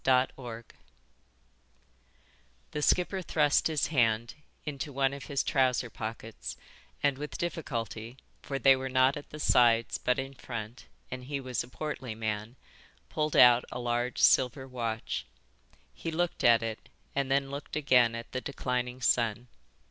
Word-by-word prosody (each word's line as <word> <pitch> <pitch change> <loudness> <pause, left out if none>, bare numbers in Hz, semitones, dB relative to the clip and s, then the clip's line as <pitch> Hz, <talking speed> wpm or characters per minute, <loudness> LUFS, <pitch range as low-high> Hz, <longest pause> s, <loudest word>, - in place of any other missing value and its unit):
IV 130 0 +4
Red 120 -3 -8 2.1
THE 150 - -3
skipper 180 +5 +2
thrust 150 -4 +2
his 155 -3 +1
hand 115 -3 +2 0.3
into 145 0 -4
one 135 0 +1
of 140 - -7
his 140 -2 -1
trouser 130 -4 +1
pockets 110 0 -6 0.5
and 140 -2 +2
with 150 0 -5
difficulty, 120 - -4 0.2
for 140 - -3
they 135 0 +6
were 130 0 -4
not 130 +1 +4
at 150 - -8
the 150 - -9
sides 115 -4 +4
but 125 - +1
in 135 0 -4
front 120 -2 -7 0.2
and 125 0 -6
he 140 +1 -3
was 130 -2 -2
a - - -12
portly 130 -4 -5
man, 110 +1 -3 0.5
pulled 155 -1 -1
out 125 0 +8
a - - -4
large 120 0 -1
silver 130 +1 +4
watch. 115 -3 -3 0.7
He 165 - -5
looked 170 +2 -1
at 115 -1 +6
it 110 -1 -5 0.2
and 140 -1 -1
then 135 0 +1
looked 140 +1 -6
again 125 -6 +4
at 115 0 -7
the 130 - -3
declining 125 -2 -3
sun. 120 -1 +1
130 Hz, 150 wpm, -30 LUFS, 120-140 Hz, 2.1 s, out